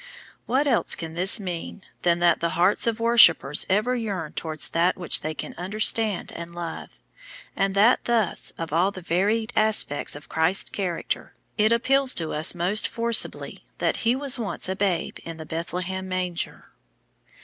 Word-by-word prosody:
What 265 Hz, +4 st, +1 dB
else 250 Hz, -6 st, +2 dB
can 165 Hz, -1 st, -7 dB
this 185 Hz, +6 st, +2 dB
mean 180 Hz, 0 st, -6 dB, 0.2 s
than 170 Hz, -1 st, +2 dB
that 170 Hz, -2 st, +3 dB
the 170 Hz, -1 st, -2 dB
hearts 180 Hz, +6 st, +3 dB
of 230 Hz, -1 st, 0 dB
worshippers 200 Hz, -11 st, +4 dB
ever 215 Hz, +6 st, +1 dB
yearn 200 Hz, -9 st, -4 dB
towards 155 Hz, -2 st, -4 dB
that 170 Hz, +2 st, +1 dB
which 180 Hz, -, 0 dB
they 155 Hz, +1 st, -4 dB
can 130 Hz, -, -7 dB
understand 215 Hz, +2 st, 0 dB
and 170 Hz, 0 st, -9 dB
love, 170 Hz, -1 st, -7 dB, 0.6 s
and 195 Hz, 0 st, 0 dB
that 215 Hz, +5 st, +4 dB
thus, 230 Hz, -5 st, 0 dB
of 165 Hz, -2 st, -6 dB
all 175 Hz, +4 st, +3 dB
the 190 Hz, -3 st, -10 dB
varied 210 Hz, +7 st, 0 dB
aspects 215 Hz, -12 st, +1 dB
of 145 Hz, -, -11 dB
Christ's 160 Hz, +4 st, +1 dB
character, 180 Hz, -4 st, -4 dB, 0.2 s
it 215 Hz, +1 st, +2 dB
appeals 265 Hz, +3 st, +3 dB
to 160 Hz, -2 st, -2 dB
us 155 Hz, +4 st, +1 dB
most 180 Hz, +5 st, +1 dB
forcibly 230 Hz, -1 st, +1 dB
that -, -, 0 dB
He 235 Hz, +2 st, +1 dB
was 270 Hz, -1 st, +3 dB
once 215 Hz, -5 st, -3 dB
a 190 Hz, -, -2 dB
babe 190 Hz, -3 st, -2 dB
in 165 Hz, -1 st, -8 dB
the 160 Hz, -, -8 dB
Bethlehem 180 Hz, +4 st, -4 dB
manger. 180 Hz, -2 st, -4 dB
185 Hz, 165 wpm, -24 LUFS, 170-220 Hz, 0.6 s, worshippers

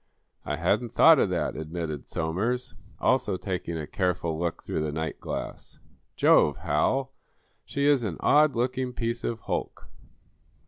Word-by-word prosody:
"I 75 Hz, -, -2 dB
hadn't 105 Hz, +9 st, 0 dB
thought -, -, +7 dB
of -, -, +2 dB
that," -, -, -1 dB
admitted 80 Hz, -2 st, -5 dB
Somers, 105 Hz, +11 st, -2 dB, 0.3 s
also 95 Hz, -, +1 dB
taking 90 Hz, -3 st, -4 dB
a 80 Hz, -, -4 dB
careful 85 Hz, -1 st, -1 dB
look 85 Hz, +1 st, -3 dB
through -, -, -2 dB
the 75 Hz, -1 st, -2 dB
nightglass. 80 Hz, +1 st, -5 dB, 0.4 s
"Jove, -, -, +4 dB
Hal, 135 Hz, 0 st, 0 dB, 0.5 s
she 140 Hz, 0 st, -2 dB
is 145 Hz, -3 st, +4 dB
an 100 Hz, -8 st, -3 dB
odd 150 Hz, -1 st, +4 dB
looking 125 Hz, +1 st, -1 dB
piece 115 Hz, 0 st, -3 dB
of 115 Hz, -1 st, -3 dB
hulk." -, -, -4 dB
95 Hz, 140 wpm, -27 LUFS, 80-125 Hz, 0.5 s, thought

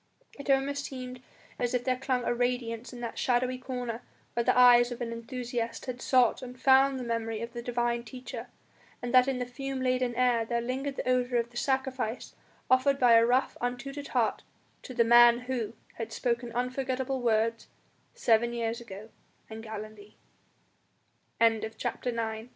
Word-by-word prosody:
It 280 Hz, -, -7 dB
almost 275 Hz, +1 st, +1 dB
seemed 255 Hz, -2 st, -7 dB, 0.4 s
as 245 Hz, 0 st, 0 dB
if 245 Hz, -, 0 dB
there 255 Hz, 0 st, +1 dB
clung 255 Hz, -1 st, -1 dB
a -, -, 0 dB
radiance 245 Hz, -1 st, -2 dB
in 245 Hz, -1 st, -9 dB
that 235 Hz, -, -5 dB
shadowy 250 Hz, 0 st, +1 dB
corner 250 Hz, -2 st, -4 dB, 0.3 s
where 235 Hz, -, 0 dB
the -, -, +2 dB
eyes 245 Hz, -1 st, +7 dB
of 240 Hz, -, -5 dB
an 235 Hz, -2 st, -3 dB
enthusiast 235 Hz, 0 st, -4 dB
had 250 Hz, -1 st, -5 dB
sought 250 Hz, -3 st, +3 dB
and 250 Hz, -1 st, -9 dB
found 270 Hz, +1 st, +5 dB
the 255 Hz, -, -4 dB
memory 225 Hz, -2 st, -2 dB
of 235 Hz, 0 st, -7 dB
the 240 Hz, -, -5 dB
Divine 240 Hz, 0 st, -1 dB
Teacher; 245 Hz, 0 st, -8 dB, 0.5 s
and 245 Hz, 0 st, -5 dB
that 255 Hz, 0 st, +6 dB
in 270 Hz, -2 st, 0 dB
the 250 Hz, -, -2 dB
fume 270 Hz, +2 st, -5 dB
laden 255 Hz, -1 st, 0 dB
air 245 Hz, -2 st, +3 dB
there 235 Hz, +1 st, -1 dB
lingered 265 Hz, +3 st, -3 dB
the -, -, -4 dB
odour 250 Hz, -1 st, +2 dB
of 235 Hz, 0 st, -1 dB
the 240 Hz, -, -9 dB
sacrifice 265 Hz, -3 st, -2 dB, 0.3 s
offered 260 Hz, +2 st, +3 dB
by 245 Hz, -3 st, +5 dB
a 230 Hz, 0 st, +7 dB
rough, 250 Hz, +3 st, +2 dB
untutored 270 Hz, +4 st, -4 dB
heart -, -, 0 dB, 0.4 s
to 255 Hz, -, -9 dB
the 235 Hz, -, +4 dB
Man 240 Hz, +1 st, +7 dB
Who 245 Hz, -4 st, -3 dB, 0.3 s
had 225 Hz, -1 st, -4 dB
spoken 235 Hz, 0 st, -2 dB
unforgettable 260 Hz, +1 st, -2 dB
words 230 Hz, -1 st, +1 dB, 0.5 s
seven 235 Hz, +1 st, +2 dB
years 230 Hz, 0 st, -2 dB
ago 215 Hz, -1 st, -10 dB, 0.4 s
in 220 Hz, 0 st, -7 dB
Galilee. 215 Hz, -1 st, -9 dB, 1.2 s
CHAPT 225 Hz, +2 st, 0 dB
245 Hz, 170 wpm, -29 LUFS, 235-255 Hz, 1.2 s, eyes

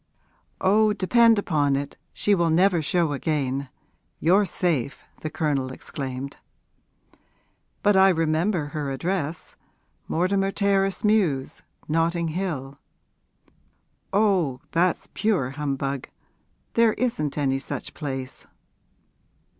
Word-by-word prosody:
'Oh, 210 Hz, +3 st, +4 dB
depend 230 Hz, +3 st, +4 dB
upon 145 Hz, -8 st, +1 dB
it 140 Hz, +1 st, -4 dB, 0.2 s
she 205 Hz, -, +1 dB
will 170 Hz, -3 st, +2 dB
never 175 Hz, +1 st, +3 dB
show 160 Hz, 0 st, +1 dB
again. 140 Hz, -2 st, -1 dB, 0.5 s
You're 190 Hz, +6 st, +4 dB
safe!' 155 Hz, -8 st, -1 dB, 0.2 s
the 155 Hz, -, -4 dB
Colonel 140 Hz, -5 st, -1 dB
exclaimed. 135 Hz, 0 st, -6 dB, 1.5 s
'But 205 Hz, -1 st, +4 dB
I 190 Hz, 0 st, +7 dB
remember 165 Hz, 0 st, +1 dB
her 150 Hz, -2 st, -2 dB
address 160 Hz, +3 st, -3 dB, 0.5 s
Mortimer 195 Hz, +3 st, +1 dB
Terrace 195 Hz, -1 st, +1 dB
Mews, 190 Hz, -11 st, +1 dB, 0.3 s
Notting 165 Hz, +1 st, +1 dB
Hill.' 155 Hz, -6 st, -4 dB, 1.3 s
'Oh, 190 Hz, -10 st, +2 dB
that's 175 Hz, +1 st, +1 dB
pure 190 Hz, -11 st, 0 dB
humbug; 140 Hz, -2 st, -3 dB, 0.6 s
there 230 Hz, -2 st, +4 dB
isn't 155 Hz, -, -2 dB
any 135 Hz, -2 st, +1 dB
such -, -, -6 dB
place.' 135 Hz, -4 st, -6 dB
165 Hz, 100 wpm, -24 LUFS, 140-195 Hz, 1.5 s, I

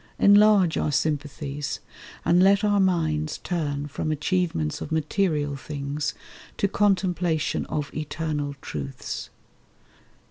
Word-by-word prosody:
Enlarge 205 Hz, -4 st, +6 dB
our 150 Hz, -, 0 dB
sympathies; 145 Hz, -1 st, -2 dB, 0.5 s
and 175 Hz, +1 st, +5 dB
let 200 Hz, +2 st, +5 dB
our 205 Hz, -1 st, +3 dB
minds 155 Hz, -5 st, +1 dB
Turn 145 Hz, -5 st, -2 dB
from 155 Hz, +2 st, -3 dB
achievements 155 Hz, -, -1 dB
of -, -, -6 dB
material 155 Hz, -2 st, 0 dB
things 145 Hz, +1 st, -4 dB, 0.4 s
To 200 Hz, -, +2 dB
contemplation 185 Hz, -6 st, +1 dB
of 150 Hz, -1 st, -3 dB
Eternal 150 Hz, -2 st, -3 dB
truths. 70 Hz, -2 st, -5 dB
155 Hz, 105 wpm, -25 LUFS, 145-185 Hz, 0.5 s, Enlarge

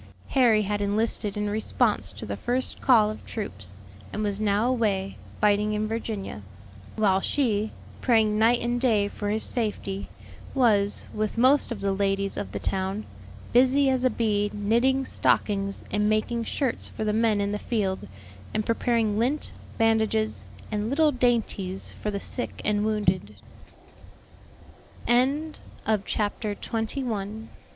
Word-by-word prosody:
Harry 235 Hz, -5 st, +4 dB
had 205 Hz, +1 st, -1 dB
enlisted 205 Hz, 0 st, 0 dB
in 210 Hz, 0 st, -1 dB
response 210 Hz, +1 st, 0 dB
to -, -, -7 dB
the -, -, -3 dB
first 250 Hz, +2 st, -1 dB
call 220 Hz, -5 st, +5 dB
of 215 Hz, -, -9 dB
troops, 100 Hz, -, -5 dB, 0.4 s
and 215 Hz, -, -3 dB
was 205 Hz, 0 st, -1 dB
now 210 Hz, +2 st, +2 dB
away, 205 Hz, -6 st, 0 dB, 0.2 s
fighting 210 Hz, 0 st, +3 dB
in 215 Hz, 0 st, -1 dB
Virginia; 215 Hz, -, -4 dB, 0.5 s
while 195 Hz, -3 st, +3 dB
she, 220 Hz, -6 st, 0 dB, 0.3 s
praying 220 Hz, -3 st, +3 dB
night 235 Hz, +2 st, +5 dB
and 240 Hz, 0 st, -1 dB
day 215 Hz, -6 st, +3 dB
for 205 Hz, 0 st, -4 dB
his 215 Hz, +1 st, +1 dB
safety, 205 Hz, -4 st, -2 dB, 0.5 s
was, 210 Hz, -6 st, +3 dB
with 215 Hz, +1 st, -2 dB
most 260 Hz, +3 st, +4 dB
of 215 Hz, -4 st, -4 dB
the 200 Hz, 0 st, +1 dB
ladies 195 Hz, 0 st, 0 dB
of -, -, -4 dB
the -, -, -4 dB
town, 190 Hz, +2 st, -2 dB, 0.5 s
busy 265 Hz, +3 st, +5 dB
as 255 Hz, -1 st, 0 dB
a 255 Hz, -, +4 dB
bee 210 Hz, -3 st, +1 dB
knitting 240 Hz, +6 st, +2 dB
stockings 200 Hz, -5 st, 0 dB
and 210 Hz, 0 st, +2 dB
making 225 Hz, +2 st, 0 dB
shirts 260 Hz, +1 st, -1 dB
for -, -, -5 dB
the 210 Hz, -1 st, 0 dB
men 220 Hz, -1 st, +2 dB
in 200 Hz, 0 st, 0 dB
the 205 Hz, -, -2 dB
field, 200 Hz, -5 st, -2 dB, 0.5 s
and 215 Hz, -1 st, 0 dB
preparing 230 Hz, -2 st, +1 dB
lint, 265 Hz, +6 st, 0 dB, 0.3 s
bandages, 205 Hz, -, +1 dB, 0.3 s
and 210 Hz, +1 st, -1 dB
little 300 Hz, +3 st, +3 dB
dainties 230 Hz, -7 st, 0 dB
for 210 Hz, -, -5 dB
the 200 Hz, -1 st, -2 dB
sick 245 Hz, -, -3 dB
and 210 Hz, 0 st, +1 dB
wounded. 190 Hz, -, 0 dB, 2.7 s
CHAPTER 210 Hz, 0 st, -1 dB
TWENTY 225 Hz, +5 st, -3 dB
SECOND. 220 Hz, -1 st, -4 dB
215 Hz, 145 wpm, -26 LUFS, 205-235 Hz, 2.7 s, call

